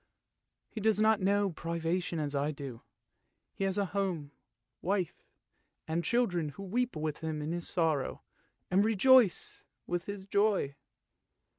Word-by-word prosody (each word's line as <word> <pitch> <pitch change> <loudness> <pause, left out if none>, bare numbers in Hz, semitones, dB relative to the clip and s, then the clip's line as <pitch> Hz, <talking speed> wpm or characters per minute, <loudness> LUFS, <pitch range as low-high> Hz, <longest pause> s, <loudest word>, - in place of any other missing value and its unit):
He 220 - -7
does 215 0 +3
not 215 -1 +4
know 200 +1 +2
privation 170 +2 -2
as 150 -2 -2
I 140 +1 +1
do! 140 -6 -6 0.7
He 195 - -2
has 195 0 0
a 200 - +2
home, 180 -8 -1 0.5
wife, 190 -2 -1 0.7
and 165 +2 0
children 180 -10 +1
who 150 +8 -9
weep 240 +3 -1
with 155 -1 -3
him 160 -1 -3
in 150 +2 -3
his 175 0 -3
sorrow 160 -6 0 0.5
and 190 +2 +5
rejoice 225 0 +4 0.2
with 175 0 -2
his 200 -1 -6
joy! 200 -8 +2
180 Hz, 140 wpm, -31 LUFS, 155-205 Hz, 0.7 s, and